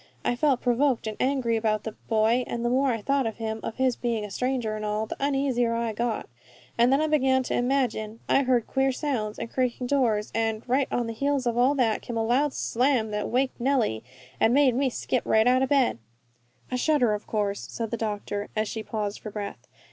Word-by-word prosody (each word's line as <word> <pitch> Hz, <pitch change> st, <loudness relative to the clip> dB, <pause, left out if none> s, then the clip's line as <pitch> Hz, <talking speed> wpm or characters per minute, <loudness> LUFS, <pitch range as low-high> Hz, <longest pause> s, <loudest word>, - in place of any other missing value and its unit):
I 245 Hz, -, +1 dB
felt 270 Hz, -1 st, +2 dB
provoked 250 Hz, 0 st, +1 dB
and 215 Hz, -1 st, -3 dB
angry 255 Hz, -3 st, +1 dB
about 215 Hz, -1 st, 0 dB
that 220 Hz, -1 st, -9 dB
boy, 225 Hz, +2 st, +2 dB
and 235 Hz, 0 st, -3 dB
the 240 Hz, -, +1 dB
more 270 Hz, +2 st, +2 dB
I 225 Hz, -3 st, -3 dB
thought 275 Hz, -1 st, +1 dB
of 225 Hz, -, -5 dB
him, 220 Hz, -1 st, -3 dB
of -, -, -5 dB
his 260 Hz, -2 st, +1 dB
being 230 Hz, -3 st, -2 dB
a 205 Hz, -, -9 dB
stranger 250 Hz, -2 st, -1 dB
and 215 Hz, -, -5 dB
all, 210 Hz, +1 st, -1 dB
the -, -, -6 dB
uneasier 270 Hz, -4 st, +1 dB
I 230 Hz, -1 st, -1 dB
got. 230 Hz, +1 st, -2 dB, 0.5 s
Then 240 Hz, +2 st, +4 dB
I 310 Hz, -, +2 dB
began 265 Hz, -4 st, +2 dB
to -, -, -3 dB
imagine 245 Hz, -4 st, 0 dB
I 275 Hz, -, +4 dB
heard 250 Hz, -4 st, +2 dB
queer 270 Hz, 0 st, +1 dB
sounds, 250 Hz, -7 st, -2 dB
and -, -, -4 dB
creaking 250 Hz, -1 st, -1 dB
doors, 240 Hz, -6 st, +1 dB
and, 225 Hz, 0 st, -1 dB
right 260 Hz, +2 st, +2 dB
on 240 Hz, -, 0 dB
the 230 Hz, -, -4 dB
heels 275 Hz, +2 st, 0 dB
of 235 Hz, -1 st, 0 dB
all 255 Hz, +4 st, +3 dB
that, 235 Hz, -5 st, +1 dB
came 235 Hz, -, -5 dB
a 225 Hz, -, +1 dB
loud 265 Hz, +5 st, +1 dB
slam 245 Hz, -3 st, +1 dB
that 210 Hz, 0 st, -2 dB
waked 255 Hz, 0 st, 0 dB
Nellie, 240 Hz, -, +1 dB, 0.4 s
and 225 Hz, +3 st, +4 dB
made 280 Hz, -3 st, +5 dB
me 265 Hz, +2 st, +1 dB
skip 250 Hz, 0 st, -1 dB
right 220 Hz, 0 st, +3 dB
out 255 Hz, +1 st, +4 dB
of 265 Hz, -, +1 dB
bed." 270 Hz, -, +2 dB, 0.7 s
"A 250 Hz, -, 0 dB
shutter, 250 Hz, -5 st, +2 dB
of 210 Hz, -, -5 dB
course," 205 Hz, -2 st, -2 dB
said 225 Hz, -2 st, -4 dB
the -, -, 0 dB
doctor, 205 Hz, -2 st, -3 dB
as 215 Hz, 0 st, 0 dB
she 220 Hz, -, -4 dB
paused 210 Hz, -2 st, -4 dB
for 215 Hz, -, -7 dB
breath. 205 Hz, -1 st, -7 dB
240 Hz, 220 wpm, -26 LUFS, 220-265 Hz, 0.7 s, made